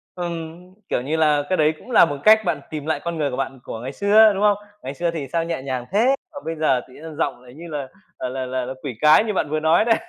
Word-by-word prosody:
Ừm, 170 -2 -5 0.3
kiểu - - 0
như 150 +5 -2
là, 150 -2 +3
cái 185 - +1
đấy 155 0 +3
cũng 255 - -13
là 195 - +7
một 145 -2 -4
cách 220 +1 +7
bạn 160 -5 -1
tìm 150 -2 -6
lại 155 -2 -1
con 170 -1 -3
người 145 -2 0
của 125 - -4
bạn 135 -1 -4
của 110 - -7
ngày 130 +3 -5
xưa, 210 +1 +5
đúng 200 +1 -2
không? 205 -1 +4 0.3
Ngày 135 +2 -5
xưa 170 +3 -1
thì 150 -5 -5
sao 165 -1 +1
nhẹ 165 -4 -3
nhàng 130 -2 -4
thế, 240 +7 +3 0.2
còn 285 - -9
bây 165 0 -3
giờ 145 -5 +1
tự 130 - -18
nhiên 155 +1 -10
giọng, 130 -4 -2
ờ, 125 - -16
như 165 +7 -11
là 145 -4 -4 0.4
là 130 0 -4
là 130 -1 -3
là 130 - -5
quỷ 130 -6 -5
cái 155 +7 +6
như 215 - -2
bạn 150 - -1
vừa 155 0 0
nói 160 +7 +3
đấy. 225 -1 +4
155 Hz, 285 wpm, -22 LUFS, 135-175 Hz, 0.4 s, là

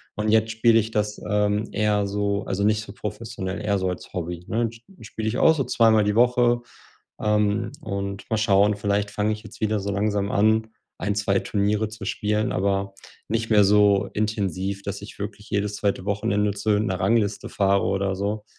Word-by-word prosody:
und 105 0 -1
jetzt 110 0 +3
spiele 115 0 +4
ich 110 +1 -2
das, 105 -1 -2
ähm, 105 +1 +1
eher 105 -1 +1
so 100 0 -1
also 100 +1 -2
nicht 105 +1 +2
so 105 -1 -10
professionell, 105 -2 -5
eher 100 -1 +1
so 95 -1 -1
als 90 - -7
Hobby, 85 0 -5
ne? 115 +1 0
Sp-spiele 115 - -8
ich 120 +4 -1
auch 160 - +6
so 135 - -1
zweimal 110 -2 +4
die 105 0 +1
Woche, 120 0 +3 0.6
ähm, 105 +1 +1
und 100 0 -4
mal 110 - +2
schauen, 105 -1 +3
vielleicht 100 0 -1
fange 105 +1 0
ich 110 +1 -6
jetzt - - -12
wieder 110 -1 +1
so 100 +1 -3
langsam 100 0 0
an, 110 +2 +3 0.3
1, 100 +3 -1
2 100 -1 +1
Turniere 105 +1 0
zu 110 -2 -9
spielen, 105 0 -1
aber 100 +1 0 0.4
nicht 115 +1 -1
mehr 105 -2 +5
so 100 0 +4
intensiv, 100 -2 -2
dass 100 0 -5
ich 105 - -11
wirklich 105 +1 -7
jedes 105 0 -1
2. 100 -2 -1
Wochenende 105 0 0
zu 105 +2 -2
irgend 105 +2 +2
'ner 95 0 -2
Rangliste 100 +1 +1
fahre 100 0 +2
oder 95 0 0
so, 105 +2 -3
105 Hz, 190 wpm, -24 LUFS, 100-110 Hz, 0.6 s, auch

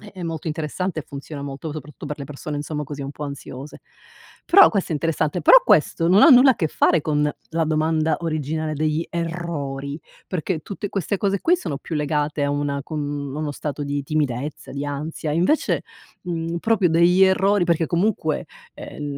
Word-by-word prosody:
è 205 0 -13
è 185 - -9
molto 165 -2 -5
interessante 160 +3 -3
e - - -8
funziona 140 +1 -8
molto. 140 +2 -6
Soprattutto, 150 0 -9
per 150 +1 -5
le 140 - -5
persone, 145 +1 -6
insomma, 150 0 -4
così, 140 0 -7
un 135 - -5
po' 150 +1 -7
ansiose. 140 0 -8 0.6
Però, 395 +3 +8
questo 200 -5 -2
è - - +1
interessante. 160 +2 -1
Però - - +8
questo, 165 - +3
non 190 +4 +6
ha - - +9
nulla 260 0 +8
a - - -8
che 160 - 0
fare 170 +2 +3
con 150 0 +1 0.2
la 165 0 0
domanda 155 0 +1
originale 155 -1 -2
degli 155 +2 0
errori 165 -4 -4 0.3
perché, 180 -2 -2
tutte 200 +4 -6
queste 195 +1 -2
cose 200 -1 0
qui, 355 +2 +3
sono 145 - -4
più 160 - -5
legate 150 0 0
a 140 - 0
una 145 0 -1
com 155 -2 -4 0.3
uno 150 -1 -3
stato 145 0 -5
di 145 0 -2
timidezza, 145 -2 -2
di 140 +1 -4
ansia, 150 +2 -4
invece, 180 - +1 0.4
mhmm, 170 -1 -3
proprio 200 -2 +2
degli 170 +3 +4
errori 190 0 +3
perché 170 -1 +1
comunque, 170 -3 0 0.3
ehm, 150 - -8
155 Hz, 185 wpm, -22 LUFS, 145-175 Hz, 0.6 s, ha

